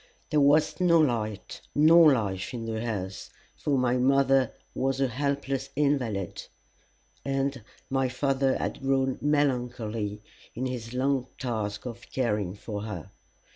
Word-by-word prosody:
There 150 Hz, -2 st, +4 dB
was 145 Hz, +5 st, +4 dB
no 170 Hz, -2 st, +5 dB
light 110 Hz, -8 st, -1 dB
nor 160 Hz, +1 st, +7 dB
life 100 Hz, -2 st, -2 dB
in 115 Hz, -1 st, -5 dB
the 110 Hz, 0 st, -3 dB
house, 100 Hz, -5 st, -4 dB, 0.3 s
for 145 Hz, -2 st, 0 dB
my 125 Hz, -1 st, +2 dB
mother 135 Hz, 0 st, +3 dB, 0.2 s
was 135 Hz, 0 st, -1 dB
a 135 Hz, -, +3 dB
helpless 140 Hz, +1 st, -2 dB
invalid, 125 Hz, -, -1 dB, 0.8 s
and 135 Hz, -2 st, -1 dB, 0.2 s
my 135 Hz, -1 st, 0 dB
father 135 Hz, +1 st, +1 dB
had -, -, -3 dB
grown 135 Hz, -1 st, +1 dB
melancholy 120 Hz, -7 st, -1 dB, 0.3 s
in 125 Hz, +3 st, -2 dB
his 125 Hz, -2 st, -5 dB
long 130 Hz, 0 st, +1 dB
task 110 Hz, -4 st, -3 dB
of 120 Hz, -1 st, -8 dB
caring 105 Hz, -7 st, -1 dB
for 105 Hz, 0 st, -6 dB
her. 100 Hz, -7 st, -6 dB
130 Hz, 135 wpm, -27 LUFS, 110-140 Hz, 0.8 s, nor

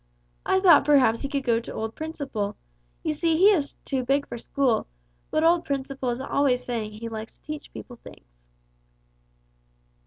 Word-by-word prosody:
I 380 Hz, -, +3 dB
thought 350 Hz, -7 st, +7 dB
perhaps 270 Hz, -6 st, +4 dB
he 275 Hz, -, -3 dB
could 280 Hz, -1 st, -2 dB
go 235 Hz, -3 st, +2 dB
to 235 Hz, -, -8 dB
old 220 Hz, 0 st, -3 dB
Principle. 280 Hz, -10 st, -4 dB, 0.5 s
You 310 Hz, -, 0 dB
see 325 Hz, +1 st, +1 dB
he 390 Hz, +5 st, +7 dB
is 300 Hz, -8 st, 0 dB
too 265 Hz, -2 st, -1 dB
big 275 Hz, +3 st, +1 dB
for 235 Hz, -, -7 dB
school, 255 Hz, -2 st, 0 dB, 0.4 s
but 310 Hz, -, +1 dB
old 335 Hz, +1 st, +4 dB
Principle 275 Hz, -3 st, -3 dB
is 240 Hz, +1 st, -2 dB
always 265 Hz, -2 st, +1 dB
saying 225 Hz, -3 st, -3 dB
he 225 Hz, +2 st, -7 dB
likes 220 Hz, 0 st, -7 dB
to -, -, -40 dB
teach 305 Hz, 0 st, -7 dB
people 245 Hz, -, -10 dB
things." -, -, -17 dB
270 Hz, 175 wpm, -25 LUFS, 230-305 Hz, 0.5 s, thought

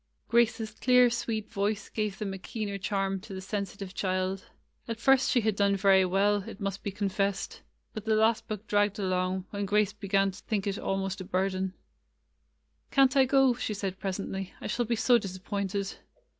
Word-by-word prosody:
Grace's 230 Hz, -2 st, +2 dB
clear, 250 Hz, +2 st, +4 dB
sweet 225 Hz, -2 st, -2 dB
voice 205 Hz, 0 st, -1 dB
gave 210 Hz, -3 st, -2 dB
them 200 Hz, -2 st, -3 dB
a 190 Hz, -, -6 dB
keener 200 Hz, 0 st, -4 dB
charm 195 Hz, 0 st, -1 dB
to 195 Hz, 0 st, -9 dB
the -, -, -5 dB
sensitive 195 Hz, 0 st, -5 dB
child. 185 Hz, 0 st, -1 dB, 0.4 s
At 230 Hz, -1 st, -4 dB
first 270 Hz, +1 st, +4 dB
she 245 Hz, -, +3 dB
had 220 Hz, -2 st, +1 dB
done 200 Hz, 0 st, +3 dB
very 195 Hz, -1 st, +5 dB
well, 195 Hz, +3 st, +3 dB
it -, -, -10 dB
must 195 Hz, -1 st, -3 dB
be -, -, -3 dB
confessed, 200 Hz, 0 st, -2 dB, 0.3 s
but 215 Hz, -1 st, -6 dB
the 220 Hz, -1 st, +2 dB
last 220 Hz, +1 st, +2 dB
book 215 Hz, 0 st, -5 dB
dragged 205 Hz, 0 st, +2 dB
along, 185 Hz, -1 st, -1 dB
when 200 Hz, -1 st, -3 dB
Grace 210 Hz, 0 st, +2 dB
began 195 Hz, -2 st, +1 dB
to 190 Hz, -, -13 dB
think 210 Hz, -4 st, -1 dB
it 200 Hz, -1 st, -2 dB
almost 195 Hz, 0 st, -2 dB
a -, -, -4 dB
burthen. 185 Hz, +1 st, -1 dB, 1.2 s
''Can't 270 Hz, 0 st, +4 dB
I 270 Hz, -1 st, +6 dB
go?" 270 Hz, -1 st, +4 dB
she 235 Hz, -2 st, -3 dB
asked 195 Hz, -1 st, -4 dB
presently. 195 Hz, -1 st, -4 dB
"I -, -, -9 dB
shall 240 Hz, +3 st, 0 dB
be 235 Hz, +1 st, 0 dB
so 240 Hz, +2 st, +4 dB
disappointed." 195 Hz, 0 st, -3 dB
200 Hz, 185 wpm, -29 LUFS, 195-220 Hz, 1.2 s, I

